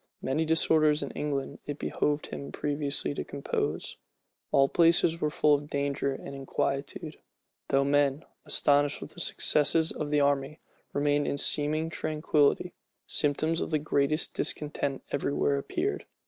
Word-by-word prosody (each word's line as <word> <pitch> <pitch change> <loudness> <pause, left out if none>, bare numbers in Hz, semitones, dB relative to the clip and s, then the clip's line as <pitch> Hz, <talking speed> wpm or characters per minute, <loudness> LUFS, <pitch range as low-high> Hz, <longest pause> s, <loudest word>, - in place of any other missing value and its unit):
Many 150 +5 0
disorders 155 -1 +3
in - - -5
England 140 -2 -3
it 145 -1 -4
behoved 150 0 -1
him 140 - -6
previously 145 -1 -2
to - - -4
compose. 140 -1 -3 0.5
All 135 - +5
places 165 +1 +3
were 150 - +1
full 150 0 +3
of 145 0 -1
danger 140 -1 -1
and 135 - -7
inquietude. 140 +2 -3 0.5
Though 135 0 +2
men, 140 +1 +1 0.2
astonished 145 0 +2
with - - -9
the - - -10
successes 160 +2 +2
of 150 - -4
the 150 0 +2
army, 140 +1 0 0.3
remained 145 0 +1
in 140 - -1
seeming 155 +3 0
tranquillity, 155 -2 +1 0.3
symptoms 155 +3 +1
of - - -2
the 155 - +1
greatest 150 +1 0
discontent 145 -2 -2
every 140 0 -1
where 140 - +1
appeared. 360 - -3
145 Hz, 145 wpm, -28 LUFS, 140-155 Hz, 0.5 s, All